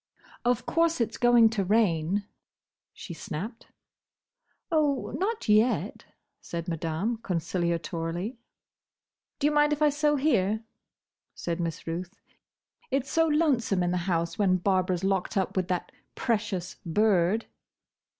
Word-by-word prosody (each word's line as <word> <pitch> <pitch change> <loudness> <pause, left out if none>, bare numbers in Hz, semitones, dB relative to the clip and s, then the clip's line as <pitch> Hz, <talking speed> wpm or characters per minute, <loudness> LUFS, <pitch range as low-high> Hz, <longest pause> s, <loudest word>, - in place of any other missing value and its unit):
"Of 245 -1 +1
course 335 -2 +2
it's 230 - -1
going 240 -2 +6
to 210 -3 0
rain," 195 -2 +1 0.7
she 175 - -9
snapped. 205 +7 -6 1.0
"Oh, 295 -4 +1
not 430 +4 -2
yet," 215 +4 +2 0.4
said 170 0 -5
Madame, 165 +7 -2
conciliatorily. 170 +2 -2 1.0
"Do 285 - -1
you 300 - +4
mind 295 0 +4
if 295 - -4
I 300 - +6
sew 295 +1 +2
here?" 220 -7 +1 0.7
said 170 0 -3
Miss 165 -2 -3
Ruth. 175 +3 -5 0.7
"It's 270 0 -1
so 325 0 +3
lonesome 275 - +2
in 175 - 0
the 180 - 0
house, 170 +1 -1
when 185 -3 +3
Barbara's 185 -1 +1
locked 195 +1 0
up 190 - 0
with 185 -2 0
that 180 -2 -2 0.2
precious 205 -6 -2
bird!" 195 +2 +2
200 Hz, 125 wpm, -27 LUFS, 175-245 Hz, 1.0 s, going